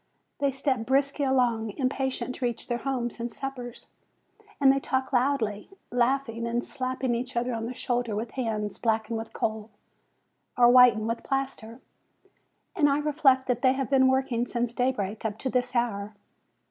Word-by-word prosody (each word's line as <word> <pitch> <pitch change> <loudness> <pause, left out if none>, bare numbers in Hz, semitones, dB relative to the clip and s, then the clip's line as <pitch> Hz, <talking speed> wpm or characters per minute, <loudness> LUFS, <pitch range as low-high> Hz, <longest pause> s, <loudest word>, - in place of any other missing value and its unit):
They 280 -1 +2
step 265 -3 -1
briskly 275 +2 +1
along, 240 -5 +1
impatient 265 -1 -1
to 255 - -3
reach 240 -2 -3
their 240 0 -1
homes 245 -3 -3
and 235 0 -3
suppers, 250 -1 -7 0.7
and 270 -2 +6
they 275 - 0
talk 260 +1 -2
loudly, 245 -5 0 0.2
laughing 240 -1 0
and 240 +1 -1
slapping 255 -2 -2
each 245 +2 -4
other 245 +1 0
on 225 0 -3
the 250 - -5
shoulder 240 -3 -1
with 225 +2 -4
hands 220 -5 -3
blackened 225 0 0
with 225 - -7
coal, 220 0 -3 0.9
or 240 -1 +7
whitened 245 -4 +6
with 230 +1 -2
plaster; 270 -4 -4 0.9
and 295 -6 +4
I 280 - +2
reflect 290 -3 +3
that 245 -1 -1
they 260 -1 +4
have 270 0 -3
been 265 -1 +5
working 260 -2 +1
since 240 -1 -2
daybreak 240 -5 -1
up 215 -1 -2
to 260 +3 -3
this 250 0 -1
hour. 210 -3 -1
245 Hz, 165 wpm, -27 LUFS, 230-265 Hz, 0.9 s, or